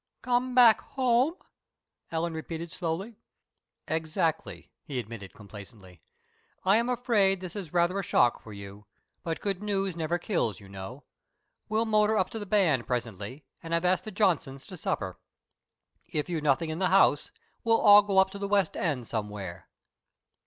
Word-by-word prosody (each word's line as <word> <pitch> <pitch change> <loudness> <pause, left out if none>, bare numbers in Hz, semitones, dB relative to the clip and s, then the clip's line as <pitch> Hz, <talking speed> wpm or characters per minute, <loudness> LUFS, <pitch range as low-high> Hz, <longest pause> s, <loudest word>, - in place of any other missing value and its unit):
"Come 250 0 0
back 235 -4 +7
home," 260 +4 +1 0.7
Ellen 165 +1 -2
repeated 160 +1 -6
slowly. 190 +6 -4 0.7
"Exactly," 160 0 -2
he 140 - -6
admitted, 110 -4 -7
complacently. 100 - -13 0.6
"I 195 +3 +5
am 235 +2 +1
afraid 220 -6 +2
this 185 +1 -7
is 190 -7 -6
rather 175 +2 +2
a - - -2
shock 120 - +2
for 110 - -12
you, 100 0 -10 0.3
but 165 -1 -3
good 195 -2 -2
news 195 -3 -1
never 170 +1 -1
kills, 170 - -1
you 100 - -14
know. 100 +8 -9 0.7
We'll 220 +1 +1
motor 215 0 +3
up 190 - 0
to 225 - -5
the 205 - -7
band 175 - +2
presently 120 +2 -4 0.2
and 165 0 -2
I've 170 +1 0
asked 185 0 +2
the - - -5
Johnsons 175 -10 0
to 185 - -9
supper. 95 - -3 0.9
If 150 +3 -3
you've 165 -3 -2
nothing 150 +2 +1
in 160 - -4
the 185 - +2
house, 185 -6 +4 0.3
we'll 225 0 +3
all 205 -1 +8
go 200 -1 -2
up 190 0 +5
to 200 - -8
the 200 - -2
west 200 -1 +2
end 140 -8 -1
somewhere. 105 -5 -5
170 Hz, 165 wpm, -28 LUFS, 125-205 Hz, 0.9 s, all